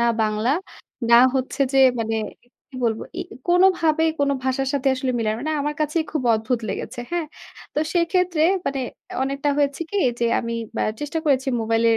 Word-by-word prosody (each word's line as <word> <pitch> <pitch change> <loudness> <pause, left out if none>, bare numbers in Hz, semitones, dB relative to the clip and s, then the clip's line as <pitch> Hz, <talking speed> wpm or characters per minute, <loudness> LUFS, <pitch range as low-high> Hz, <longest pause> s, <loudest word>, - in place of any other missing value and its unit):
না 235 - +3 0.2
বাংলা 215 +2 0 0.6
না 235 - +9 0.2
হচ্ছে 265 +2 -2
যে 270 - +3 0.2
মানে 225 0 -1 0.3
কি 245 +1 -18
বলবো 225 -1 0 0.2
এ - - -1 0.3
কোনোভাবেই 340 -3 +4
কোনো 280 0 +2
ভাষার 265 0 0
সাথে 275 -1 +1
আসলে 260 0 -2
মিলে 220 -2 0
না। 215 - 0
মানে 310 +3 -2
আমার 295 +1 -2
কাছেই 310 +2 0
খুব 305 - -1
অদ্ভুত 220 +2 -1
লেগেছে। - - -5
হ্যাঁ? 340 -3 -1 0.5
তো - - 0 0.2
সেক্ষেত্রে 345 -1 +2 0.2
মানে 275 -1 -1 0.4
অনেকটা 275 +2 -1
হয়েছে 280 0 +1
কি 410 - -2 0.2
যে, - - +2 0.2
আমি 230 -1 -4 0.3
আ - - +2 0.2
চেষ্টা 295 +2 -2
করেছি 270 -1 +2
মোবাইলের 225 0 +2
275 Hz, 175 wpm, -22 LUFS, 235-310 Hz, 0.6 s, না